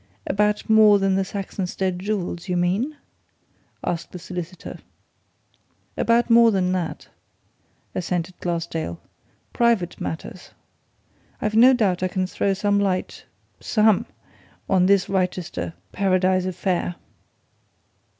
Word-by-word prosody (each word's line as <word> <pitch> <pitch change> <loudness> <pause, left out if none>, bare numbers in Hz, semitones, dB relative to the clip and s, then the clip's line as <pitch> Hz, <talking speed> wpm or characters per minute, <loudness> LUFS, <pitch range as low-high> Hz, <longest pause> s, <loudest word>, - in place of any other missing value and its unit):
"About 210 +1 0
more 215 -2 +6
than 195 -1 +1
the 195 - +2
Saxonsteade 190 -1 -3
jewels, 190 -3 -3
you 180 - +1
mean?" 200 +12 0 0.9
asked 170 -1 -3
the - - -7
solicitor. 180 0 -7 1.2
"About 235 +1 +2
more 230 0 +6
than 185 -4 +1
that," 180 -3 -3 0.8
assented 180 0 -2
Glassdale. 165 - -3 0.5
"Private 230 -7 +1
matters. 165 +2 -6 0.9
I've 215 - -1
no 250 +4 +7
doubt 200 -8 +1
I 185 - +1
can 185 +1 -1
throw 195 +1 -1
some 205 0 +1
light 190 -2 -2 0.3
some! 215 -3 +2 0.6
on 185 -1 +3
this 200 -1 +3
Wrychester 180 - -2 0.2
Paradise 185 -1 +2
affair. 180 -1 -1
185 Hz, 110 wpm, -23 LUFS, 180-205 Hz, 1.2 s, no